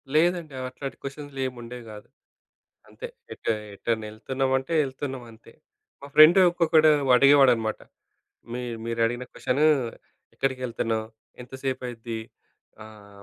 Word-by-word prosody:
లేదండి. 170 -2 +2 0.2
అట్లాంటి 135 +1 -7
క్వెషన్స్‌లేంముండేవి 130 -4 -6
గాదు. 105 0 -11 0.8
అంతే. - - -8 0.3
ఎటు - - -4 0.2
ఎటైనా 110 +1 -2
ఎళ్తున్నామంటే 130 +5 -1
ఎళ్తున్నాం 135 -1 -5
అంతే. 110 0 -17 0.5
మా - - -8
ఫ్రెండ్ 155 +5 +8
ఒక్కొక్కడు 160 -2 +4 0.3
అడిగేవాడనమాట. 130 -5 +5 0.7
మీ 125 - -3 0.2
మీరు 115 0 -3
అడిగిన 120 +2 -3
క్వెషను 145 +4 0 0.7
ఎక్కడికిళ్తున్నావు? 120 -4 -2 0.4
ఎంతసేపయిద్ది? 125 -3 -5 0.6
ఆహ్, 100 -2 -14
130 Hz, 95 wpm, -25 LUFS, 115-140 Hz, 0.8 s, ఫ్రెండ్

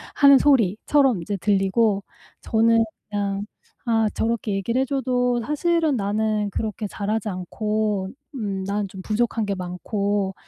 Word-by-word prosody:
하는 280 -1 +7
소리처럼 255 -2 +3
이제 200 +5 -3
들리고 200 +2 +2 0.4
저는 225 0 +3 0.3
그냥 200 -1 -2 0.4
'아 225 -2 +2
저렇게 225 -2 -1
얘기를 230 +6 0
해 - - +1
줘도 250 -3 0
사실은 320 -1 +1
나는 210 0 0
그렇게 215 0 -3
잘하지 210 +2 -2
않고 210 +2 -2 0.3
음 200 -6 -3
난 200 0 -1
좀 190 0 -9
부족한 220 +2 0
게 200 - -1
많고, 195 +2 -2
215 Hz, 270 characters per minute, -23 LUFS, 200-235 Hz, 0.4 s, 하는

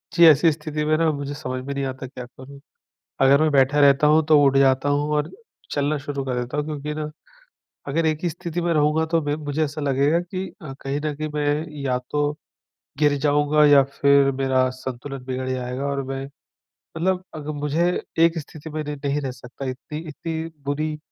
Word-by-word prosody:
जी. 170 - +7
ऐसी 160 +2 +6
स्थिति 150 0 -4
में 155 +1 +3
ना 160 -1 +2
मुझे 145 -1 -4
समझ 130 -3 -5
में 140 - -3
नहीं 140 0 -2
आता 130 0 -5
क्या 125 -1 -8
करूँ? 130 +3 -13 0.6
अगर 140 +2 +6
मैं 155 - +4
बैठा 140 +1 +3
रहता 140 +1 +5
हूँ 155 +1 +5
तो 155 -1 +5
उठ 135 -1 +4
जाता 135 +1 +3
हूँ 145 +1 +1
और 150 0 -1 0.4
चलना 145 +1 0
शुरू 140 -1 -4
कर 125 -2 -1
देता 125 +4 -5
हूँ 150 - 0
क्योंकि 150 -1 -4
ना, 150 0 -4 0.8
अगर 160 +4 0
एक 155 -1 +1
ही 175 - +1
स्थिति 175 +1 -4
में 170 0 0
रहूँगा 155 +1 +2
तो 165 -1 +3
मैं 145 0 -1
मुझे 150 0 -2
ऐसा 150 +1 -4
लगेगा 140 +4 +2
कि 185 +2 -5
अ, 150 -5 -7
कहीं 135 +1 -2
न 150 - -1
कहीं 155 +1 -4
मैं 150 +1 0 0.2
या 130 -2 0
तो, 145 0 +1 0.7
गिर 150 -1 +4
जाऊँगा 145 +1 +3
या 145 -1 +7
फिर 140 0 +3
मेरा 130 -1 +1
संतुलन 130 +1 -7
बिगड़ 130 0 -3
जाएगा। 130 +1 -3
और 140 -1 -1
मैं 135 0 -4 0.7
मतलब 185 +2 0
अग 150 -2 -7
मुझे 150 +4 +1 0.3
एक 165 0 +4
स्थिति 155 +1 -9
में 155 0 -3
न - - -8 0.2
नहीं 140 +1 0
रह 135 - -3
सकता, 125 +1 -9
इत्ती 130 +4 -6
इत्ती 160 +1 -4 0.2
बुरी 150 +2 -2
145 Hz, 200 wpm, -23 LUFS, 135-155 Hz, 0.8 s, जी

